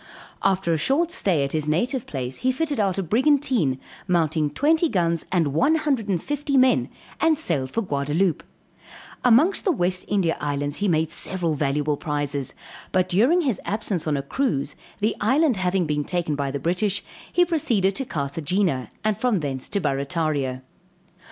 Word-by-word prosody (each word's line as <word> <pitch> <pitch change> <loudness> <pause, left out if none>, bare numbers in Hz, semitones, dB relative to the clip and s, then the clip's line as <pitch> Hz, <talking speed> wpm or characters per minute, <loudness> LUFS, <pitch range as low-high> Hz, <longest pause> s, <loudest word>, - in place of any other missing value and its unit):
After 190 -3 +1
a 160 - 0
short 315 - +1
stay 175 - +1
at 140 - -2
his 155 -1 -1
native 240 - 0
place 130 -2 -4
he 255 - +1
fitted 290 0 -2
out 195 -3 +1
a 195 - 0
brigantine, 240 - +2 0.3
mounting 160 -4 +1
twenty 315 - +2
guns 170 - 0
and 165 -6 +1
one 275 - +3
hundred 285 -8 0
and 185 -3 +1
fifty 290 -1 -1
men, 255 0 +4 0.3
and 320 -1 +3
sailed 150 - -1
for 230 - -1
Gaudaloupe; 150 +2 0 0.8
amongst 265 - +4
the 385 - +3
West 185 - -1
India 190 -5 +1
Islands, 145 0 -2
he 205 - 0
made 160 -2 +1
several 170 -1 -1
valuable 145 0 0
prizes; 145 -3 -3 0.4
but 185 0 +1
during 245 - +4
his 255 - -1
absence 200 -5 -2
on 150 -2 +1
a 140 - -3
cruise 145 - -1 0.3
the 215 +2 +1
island 260 +3 +3
having 185 -1 +1
been 150 -1 -1
taken 175 -2 -2
by 140 -1 -2
the 140 - -3
British, 185 +7 -1 0.3
he 355 - +4
proceeded 235 - +1
to 270 - -2
Carthagena, 155 - -1
and 215 -2 0
from 235 -8 +1
thence 135 -3 -4
to 200 - 0
Barrataria. 140 -3 -1
180 Hz, 170 wpm, -24 LUFS, 150-245 Hz, 0.8 s, men